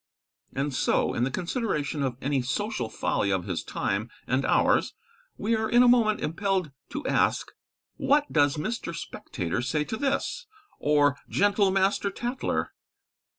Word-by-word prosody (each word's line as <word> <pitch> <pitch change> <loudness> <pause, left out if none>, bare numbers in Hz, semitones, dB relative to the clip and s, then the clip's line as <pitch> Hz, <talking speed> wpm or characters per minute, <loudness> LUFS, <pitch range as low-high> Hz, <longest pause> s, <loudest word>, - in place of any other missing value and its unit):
And 140 +1 -1
so, - - +1
in 120 - +1
the - - -1
consideration 170 - -2
of 130 -3 -1
any 140 -1 +1
social 205 - -2
folly 100 -2 0
of 95 -2 0
his 90 -4 -3
time 105 +4 -2 0.2
and 130 +2 +1
ours, - - +3 0.4
we 225 +3 +1
are 220 0 -1
in 240 +1 +6
a - - +5
moment 230 -3 +4
impelled 185 -1 -1 0.2
to 295 - -5
ask - - +1 0.5
What 290 +1 +3
does 145 -1 +3
Mr. 170 0 -3
Spectator 90 - -4
say 150 +4 0
to 220 - -4
this; 285 - -1 0.3
or 145 -1 +3
gentle 205 0 +3
Master 195 +1 +2
Tatler? 240 +6 -2
170 Hz, 150 wpm, -27 LUFS, 135-220 Hz, 0.5 s, in